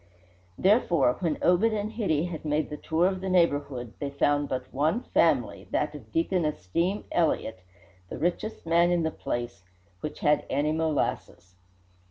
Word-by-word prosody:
Therefore 175 - +3
when 165 -4 -1
Obed 180 +4 +4
and 210 0 -2
Hitty 195 -10 0
had 175 -3 -6
made 150 0 -1
the - - -3
tour 160 +3 +1
of 185 0 0
the 190 - -3
neighbourhood 145 -9 +1
they 140 - -3
found 145 +1 +1
but 130 -1 -4
one 155 - +1
family, - - +1
that - - -1
of - - -11
Deacon 195 - +1
Esteem 155 - -1
Elliott, 150 - 0 0.5
the - - -6
richest 175 - -2
man 170 +1 +4
in 175 -1 +1
the 160 - 0
place, 120 -5 -5 0.4
which 150 - -6
had 150 0 +3
any 150 +2 +1
molasses. 155 - -2
160 Hz, 160 wpm, -27 LUFS, 145-180 Hz, 0.5 s, Obed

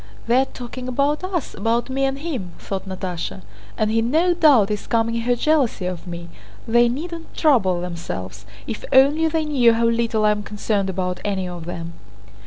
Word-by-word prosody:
"They 240 +3 +4
are - - +1
talking 250 0 -8
about 280 +5 0
us, 370 -5 -3
about 230 +1 0
me 270 +1 0
and 270 0 -1
him!" 265 - -5
thought 195 0 -5
Natásha. 175 - -5 0.3
"And 215 -1 +1
he 225 +1 +2
no 320 +10 +2
doubt 280 - +5
is 210 - -3
calming 230 0 +1
her 245 +1 +1
jealousy 270 -8 +1
of 180 0 -5
me. 170 -1 -6 0.4
They 240 +1 +4
needn't 330 +6 -6
trouble 205 - +3
themselves! 105 - -6 0.2
If 220 - -5
only 290 +5 +5
they 320 0 0
knew 255 -6 +4
how 230 +1 +1
little 230 -2 +1
I 210 - +5
am 210 0 -1
concerned 205 -1 -1
about 180 -1 -2
any 195 -3 -1
of 175 -2 -7
them." 170 -1 -6
230 Hz, 185 wpm, -22 LUFS, 185-270 Hz, 0.4 s, doubt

